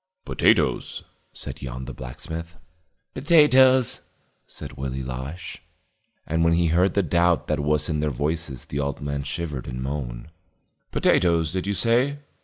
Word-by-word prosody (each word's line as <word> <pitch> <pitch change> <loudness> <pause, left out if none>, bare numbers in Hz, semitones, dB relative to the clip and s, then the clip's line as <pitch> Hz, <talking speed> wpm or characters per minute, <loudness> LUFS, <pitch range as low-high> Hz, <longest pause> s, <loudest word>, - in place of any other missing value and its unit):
"Potatoes," - - +1 0.3
said - - -6
Yon 65 0 -6
the 65 - -7
blacksmith. 80 +7 -7 0.6
"Potatoes," 130 -5 +5 0.5
said - - -8
Willie 65 0 -4
Losh. 65 +6 -6 0.6
And 80 +1 0
when 85 0 +4
he 85 0 +2
heard 90 +3 +2
the 100 - +3
doubt 85 +1 +2
that - - -1
was 75 +1 +1
in 75 -2 -1
their 75 0 +1
voices 75 0 -3
the 70 - -4
old 70 -1 -2
man 70 -1 -3
shivered 75 -2 -4
and 65 0 -5
moaned. 65 -1 -4 0.6
"Potatoes, 85 -3 +2
did 95 0 -2
you 100 - 0
say?" 125 +7 +2
80 Hz, 145 wpm, -24 LUFS, 70-90 Hz, 0.6 s, Potatoes